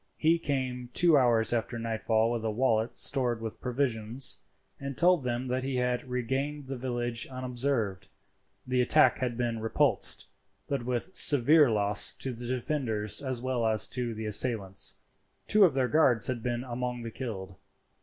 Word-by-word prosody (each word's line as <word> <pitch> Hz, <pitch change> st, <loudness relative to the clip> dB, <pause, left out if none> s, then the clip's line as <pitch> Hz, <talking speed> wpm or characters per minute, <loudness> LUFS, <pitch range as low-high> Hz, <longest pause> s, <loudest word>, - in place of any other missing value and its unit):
He 165 Hz, +2 st, +2 dB
came 130 Hz, -5 st, -3 dB
two 170 Hz, -2 st, +5 dB
hours 120 Hz, -4 st, +3 dB
after 120 Hz, 0 st, -2 dB
nightfall 115 Hz, 0 st, 0 dB
with 120 Hz, -2 st, -3 dB
a 110 Hz, -, -1 dB
wallet 115 Hz, 0 st, 0 dB
stored 125 Hz, -4 st, +1 dB
with 115 Hz, -1 st, -7 dB
provisions, 125 Hz, -1 st, -2 dB, 0.4 s
and 140 Hz, -1 st, -6 dB
told 175 Hz, -3 st, +3 dB
them 125 Hz, +1 st, -3 dB
that 130 Hz, +1 st, -1 dB
he 135 Hz, 0 st, -3 dB
had 125 Hz, 0 st, -1 dB
regained 135 Hz, +4 st, -3 dB
the 135 Hz, +1 st, -5 dB
village 120 Hz, -2 st, -3 dB
unobserved. 125 Hz, -6 st, -2 dB, 0.6 s
The 125 Hz, 0 st, +1 dB
attack 155 Hz, +5 st, +4 dB
had 125 Hz, -3 st, -2 dB
been 120 Hz, -2 st, -2 dB
repulsed, 115 Hz, -, 0 dB, 0.4 s
but 140 Hz, -3 st, -2 dB
with 125 Hz, +9 st, -3 dB
severe 145 Hz, +1 st, +6 dB
loss 105 Hz, -2 st, +3 dB
to 130 Hz, -, -4 dB
the 120 Hz, +1 st, -8 dB
defenders 120 Hz, -5 st, -1 dB
as 130 Hz, -3 st, -3 dB
well 130 Hz, -2 st, -1 dB
as 110 Hz, -1 st, +4 dB
to 120 Hz, -2 st, -3 dB
the 110 Hz, 0 st, -6 dB
assailants. 105 Hz, -3 st, +1 dB, 0.5 s
Two 210 Hz, -2 st, +5 dB
of 160 Hz, -7 st, +1 dB
their 130 Hz, -2 st, +1 dB
guards 125 Hz, -8 st, +3 dB
had 125 Hz, -2 st, -2 dB
been 120 Hz, +1 st, -3 dB
among 125 Hz, -1 st, -4 dB
the 115 Hz, -, -6 dB
killed. 100 Hz, -7 st, -6 dB
125 Hz, 165 wpm, -28 LUFS, 115-130 Hz, 0.6 s, severe